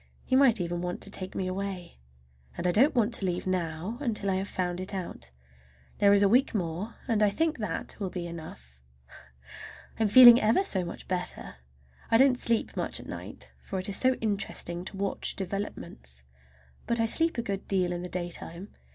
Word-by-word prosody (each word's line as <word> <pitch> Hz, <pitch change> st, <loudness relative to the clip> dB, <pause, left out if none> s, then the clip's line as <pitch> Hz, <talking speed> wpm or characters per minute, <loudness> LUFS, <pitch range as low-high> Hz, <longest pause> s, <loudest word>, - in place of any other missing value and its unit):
He 260 Hz, -, +1 dB
might 260 Hz, -5 st, +5 dB
even 175 Hz, 0 st, -3 dB
want 180 Hz, 0 st, -4 dB
to 200 Hz, -, +1 dB
take 185 Hz, -2 st, -3 dB
me 190 Hz, -, -2 dB
away. 185 Hz, -, -5 dB, 0.6 s
I -, -, -4 dB
don't 215 Hz, -, +3 dB
want 235 Hz, -1 st, +2 dB
to 200 Hz, -, +6 dB
leave 175 Hz, 0 st, -2 dB
now 180 Hz, +4 st, -3 dB
until 210 Hz, -7 st, -1 dB
I 185 Hz, -, 0 dB
have 190 Hz, +1 st, -3 dB
found 180 Hz, -2 st, -3 dB
it 185 Hz, +2 st, -5 dB
out. 175 Hz, -, -7 dB, 0.7 s
There 200 Hz, -1 st, +5 dB
is 200 Hz, 0 st, +5 dB
a -, -, +5 dB
week 245 Hz, +4 st, +3 dB
more, 180 Hz, +4 st, -3 dB
and 225 Hz, -4 st, +1 dB
I 210 Hz, -, +5 dB
think 315 Hz, +6 st, -1 dB
that 210 Hz, -6 st, -4 dB
will 195 Hz, -3 st, -3 dB
be 180 Hz, -1 st, -5 dB
enough. 110 Hz, -, -10 dB, 1.2 s
I'm 220 Hz, -, +3 dB
feeling 240 Hz, +2 st, +9 dB
ever 225 Hz, -, +3 dB
so 190 Hz, -, 0 dB
much 170 Hz, -, -8 dB
better! 180 Hz, -, -4 dB, 0.5 s
I 225 Hz, -, +5 dB
don't 265 Hz, +1 st, +5 dB
sleep 230 Hz, -1 st, +1 dB
much -, -, -1 dB
at -, -, -11 dB
night, -, -, -9 dB
for 195 Hz, -, -5 dB
it 185 Hz, +2 st, -3 dB
is 200 Hz, -, +1 dB
so 260 Hz, 0 st, +3 dB
interesting 200 Hz, -5 st, -3 dB
to 195 Hz, -, -7 dB
watch 200 Hz, 0 st, -1 dB
developments; 175 Hz, -, -6 dB, 0.6 s
but 235 Hz, 0 st, 0 dB
I 225 Hz, -, +3 dB
sleep 325 Hz, +6 st, +1 dB
a 235 Hz, -, -1 dB
good 200 Hz, -3 st, -4 dB
deal 185 Hz, -2 st, +1 dB
in 175 Hz, 0 st, -3 dB
the 180 Hz, -, -6 dB
daytime. 175 Hz, +1 st, -5 dB
195 Hz, 195 wpm, -28 LUFS, 175-225 Hz, 1.2 s, feeling